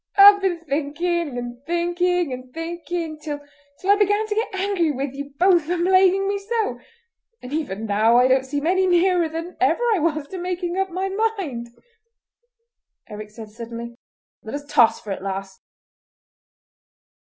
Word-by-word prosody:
I've 405 0 +9
been 375 -3 +1
thinking 310 0 -2
and 245 +1 -6
thinking 350 -2 0
and 255 0 -9
thinking, 330 0 -5
till 295 -1 -5 0.5
I 405 - +7
began 415 +1 +2
to 430 - -2
get 440 -2 -2
angry 380 -4 +1
with 275 -1 -3
you 280 0 -8
both 355 -3 +4
for 350 +3 -1
plaguing 375 +2 +4
me 400 0 -1
so; 410 - -2 0.6
and 250 +3 -9
even 225 -9 -3
now 220 +3 +3
I 250 +1 +5
don't 260 0 +3
seem 285 +2 -3
any 375 +2 +2
nearer 355 -1 +3
than 330 +3 -6
ever 390 +5 +2
I 400 - +1
was 305 -2 -1
to 375 - -6
making 355 0 -3
up 385 0 0
my 370 +2 -2 0.3
mind." 250 -11 -5 1.4
Eric 210 0 -8
said 215 0 -11
suddenly: 235 +1 -7 0.5
"Let 220 - -6
us 290 0 -6
toss 235 -5 +4
for 210 - -8
it, 195 - -4
lass!" 195 0 -5
330 Hz, 160 wpm, -22 LUFS, 255-370 Hz, 1.4 s, I've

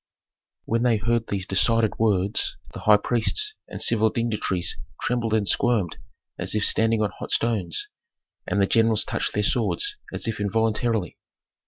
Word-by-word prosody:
When 115 +1 0
they 120 -2 +3
heard 115 +2 0
these 95 -2 -3
decided 110 +3 +2
words, 100 -2 +1 0.2
the - - -7
high 105 -1 +5
priests 120 - +1
and - - -8
civil 110 -1 +3
dignitaries 105 -6 -1 0.2
trembled 115 -3 0
and 105 -2 0
squirmed 110 -9 +1 0.4
as - - 0
if 105 - +2
standing 110 -1 +3
on 105 - -1
hot - - -6
stones, 105 -8 0 0.6
and 95 +3 0
the 100 - +4
generals 110 0 +3
touched - - -2
their 105 - +1
swords 270 - 0
as - - -4
if 115 -2 -3
involuntarily. 110 -1 0
110 Hz, 155 wpm, -24 LUFS, 100-115 Hz, 0.6 s, high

